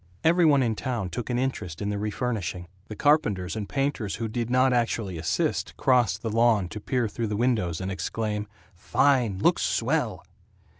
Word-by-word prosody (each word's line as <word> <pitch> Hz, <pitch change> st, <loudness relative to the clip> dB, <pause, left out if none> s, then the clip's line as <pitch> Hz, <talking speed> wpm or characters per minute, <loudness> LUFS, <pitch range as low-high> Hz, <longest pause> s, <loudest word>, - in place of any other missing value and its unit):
Every 170 Hz, +1 st, +4 dB
one 140 Hz, -4 st, +5 dB
in 115 Hz, -2 st, +1 dB
town 110 Hz, -7 st, -3 dB
took 115 Hz, +8 st, -5 dB
an 120 Hz, -, 0 dB
interest 125 Hz, -10 st, -3 dB
in 100 Hz, -, -2 dB
the 105 Hz, 0 st, -2 dB
refurnishing. 105 Hz, -5 st, -3 dB, 0.2 s
The 110 Hz, -, -7 dB
carpenters 105 Hz, -, +2 dB
and 105 Hz, -2 st, -4 dB
painters 135 Hz, -7 st, -1 dB
who 115 Hz, +1 st, -3 dB
did 115 Hz, +1 st, -3 dB
not 130 Hz, +1 st, +3 dB
actually 115 Hz, -7 st, -1 dB
assist 80 Hz, -, -1 dB
crossed 125 Hz, -3 st, +2 dB
the 115 Hz, -, -2 dB
lawn 110 Hz, -5 st, +3 dB
to 105 Hz, -, -6 dB
peer 125 Hz, +1 st, 0 dB
through 115 Hz, +2 st, -3 dB
the 105 Hz, -1 st, -2 dB
windows 110 Hz, -9 st, 0 dB
and 95 Hz, 0 st, -3 dB
exclaim, 105 Hz, +3 st, -3 dB, 0.3 s
"Fine! 120 Hz, +2 st, +2 dB
Looks 95 Hz, -, +2 dB
swell!" -, -, 0 dB
110 Hz, 180 wpm, -26 LUFS, 100-125 Hz, 0.3 s, one